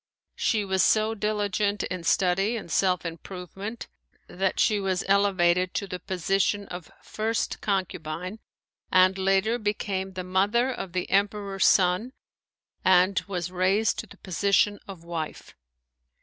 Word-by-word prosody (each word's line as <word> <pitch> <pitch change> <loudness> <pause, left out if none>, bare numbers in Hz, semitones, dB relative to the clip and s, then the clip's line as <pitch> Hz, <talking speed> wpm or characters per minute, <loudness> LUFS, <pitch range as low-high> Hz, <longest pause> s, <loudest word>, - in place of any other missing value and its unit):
She 215 -3 0
was 190 -1 +1
so 215 0 +3
diligent 205 -1 -1
in 180 -2 -4
study 195 +6 +2
and 170 - -8
self 180 0 +1
improvement 185 +6 -7 0.4
that 190 +1 -1
she 210 -1 +3
was 190 -2 -1
elevated 185 -2 +2
to 200 - -1
the 185 -2 -6
position 195 +2 0
of 175 -3 -8
first 220 +1 -2
concubine 185 0 -3 0.5
and 185 +1 +5
later 195 +5 +1
became 195 -3 -2
the 185 0 -5
mother 205 +8 +1
of 190 -7 -6
the 180 -1 -2
Emperor's 200 0 +1
son 185 +7 +3 0.7
and 185 +1 +4
was 180 -2 -3
raised 190 +4 +1
to - - -6
the - - -15
position 200 +3 +1
of 190 -4 -10
wife. 165 -2 -6
195 Hz, 135 wpm, -26 LUFS, 180-205 Hz, 0.7 s, and